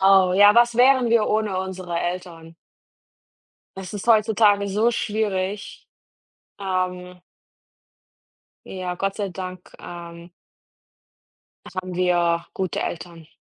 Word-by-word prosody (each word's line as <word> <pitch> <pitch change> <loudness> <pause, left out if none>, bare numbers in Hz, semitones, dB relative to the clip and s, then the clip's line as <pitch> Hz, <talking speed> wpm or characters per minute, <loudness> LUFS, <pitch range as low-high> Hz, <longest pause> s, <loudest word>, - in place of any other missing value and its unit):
Oh, 190 -1 +5
ja, 205 +2 +7
was 235 0 +4
wären 255 0 +5
wir 230 -2 +3
ohne 210 -3 0
unsere 185 -2 -4
Eltern? 175 -2 -6 1.2
Es 190 0 -8
ist 205 +1 -6
heutzutage 215 -2 +3
so 215 +4 +2
schwierig, 205 -3 -3 0.7
ähm 180 -1 -3 1.5
Ja, 185 -1 -5
Gott 195 +2 -2
sei 205 -2 -2
Dank, 185 -1 -8
ähm 170 0 -10 1.4
haben 185 -1 -5
wir 175 -2 +1
gute 185 -5 -2
Eltern. 170 -2 -6
190 Hz, 105 wpm, -23 LUFS, 180-205 Hz, 1.5 s, ja